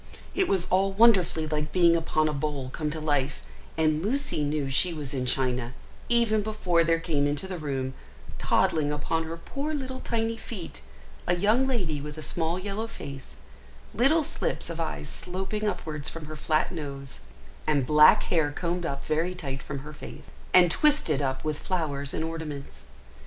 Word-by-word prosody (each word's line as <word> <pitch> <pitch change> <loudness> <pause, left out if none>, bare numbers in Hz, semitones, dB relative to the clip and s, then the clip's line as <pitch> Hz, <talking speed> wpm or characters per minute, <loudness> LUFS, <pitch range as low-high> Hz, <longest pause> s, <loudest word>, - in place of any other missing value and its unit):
It 380 -2 +2
was 185 -2 +2
all 195 +1 +3
wonderfully 195 -7 +4
like 150 -1 -2
being 170 -2 +5
upon 155 -1 +1
a 155 - -1
bowl 140 -2 -2
come 155 +1 -2
to 155 +1 -4
life, 145 -3 0 0.3
and 155 -1 +2
Lucy 240 - 0
knew 145 -1 -1
she 165 +6 +2
was 145 -3 -5
in 130 -2 -2
China, 125 -2 0 0.4
even 230 -3 +4
before 190 -5 +1
there 165 0 +2
came 150 -4 +1
into 145 +6 -2
the 185 -2 -4
room, 135 -3 -2 0.5
toddling 150 -2 +2
upon 160 +2 -1
her 165 +1 -5
poor 285 - -4
little 260 -2 -4
tiny 230 -1 -1
feet, 195 - -7 0.5
a 175 - +3
young 220 +8 +3
lady 180 - -1
with 150 +1 -7
a 155 - -6
small 165 +3 -1
yellow 200 +4 -3
face, 140 -10 -9 0.6
little 295 +7 +4
slips - - -1
of - - -6
eyes - - -3
sloping 190 +4 -3
upwards 155 -7 -3
from 165 -2 -7
her 155 +1 -7
flat 155 0 +1
nose, 140 - -5 0.5
and 145 -4 +2
back 150 +2 +7
hair 160 -4 +1
combed 170 +2 -2
up 140 -2 -4
very 165 +4 0
tight 135 -5 -5
from 140 0 -6
her 150 - -8
face, 145 - -11 0.2
and 175 -2 +6
twisted 290 - +4
up 130 -1 -1
with 155 -1 -2
flowers 145 -6 -1
and 160 - -2
ornaments. 160 -4 -6
160 Hz, 175 wpm, -27 LUFS, 145-190 Hz, 0.6 s, back